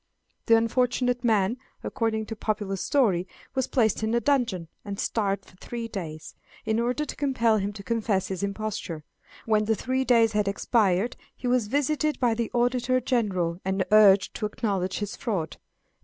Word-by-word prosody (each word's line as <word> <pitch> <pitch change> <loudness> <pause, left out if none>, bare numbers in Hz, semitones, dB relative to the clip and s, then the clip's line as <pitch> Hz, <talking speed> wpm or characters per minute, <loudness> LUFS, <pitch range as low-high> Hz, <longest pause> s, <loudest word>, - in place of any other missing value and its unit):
The 230 -1 +7
unfortunate 245 +2 +1
man, 220 -1 +2 0.3
according 225 -4 -1
to 225 - -6
popular 210 -2 -2
story, 195 -5 +1 0.3
was 260 -2 0
placed 220 -6 +1
in 220 +1 0
a - - +4
dungeon, 235 - 0 0.2
and 200 -1 -6
starved 200 -3 -1
for - - -19
three 235 +3 -5
days, 165 -8 -7 0.3
in 220 +1 +1
order 250 +6 0
to - - -6
compel 235 -6 +2
him 200 0 -1
to 200 -1 -9
confess 220 -4 0
his 190 -1 -3
imposture. 200 -6 -4 0.4
When 215 -1 +2
the 220 +1 +2
three 260 +5 -1
days 230 -3 +4
had 210 -1 0
expired 200 +1 +1 0.2
he - - -10
was 245 -3 +2
visited 295 +4 0
by 245 -3 +3
the 230 0 -2
Auditor 245 +1 +1
General, 195 -9 0
and 190 0 0
urged 205 -2 +6
to 215 - -1
acknowledge 195 -4 -2
his 205 -1 -4
fraud. 195 - -3
220 Hz, 170 wpm, -26 LUFS, 200-245 Hz, 0.4 s, The